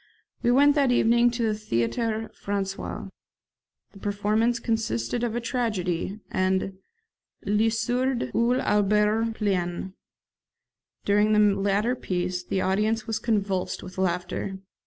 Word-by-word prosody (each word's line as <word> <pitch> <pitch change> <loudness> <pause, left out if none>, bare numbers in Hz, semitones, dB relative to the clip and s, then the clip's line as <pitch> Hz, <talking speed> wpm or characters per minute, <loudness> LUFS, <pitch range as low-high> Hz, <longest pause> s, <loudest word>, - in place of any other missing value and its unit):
We 240 - +2
went 285 +4 +6
that 280 -3 +2
evening 240 0 +4
to 235 0 -2
the 220 -1 +2
Theatre 215 - -1
Francais. 195 -1 -4 0.8
The 200 - -15
performance 210 +4 +1
consisted 225 - -1
of 235 -2 -1
a - - 0
tragedy; 210 -6 -2
and 190 0 0 0.7
'Le 210 +3 +2
Sourd, 245 +3 -1
ou 235 +2 +2
l'Auberge 210 +1 +2
pleine'. 185 -3 -1 1.1
During 210 +1 +3
the 210 -1 +4
latter 205 +5 +1
piece 180 -4 -2
the 190 +1 -1
audience 215 +3 +1
was 220 -1 -2
convulsed 200 -4 -1
with 185 0 -8
laughter. 185 +1 -2
210 Hz, 120 wpm, -26 LUFS, 190-230 Hz, 1.1 s, went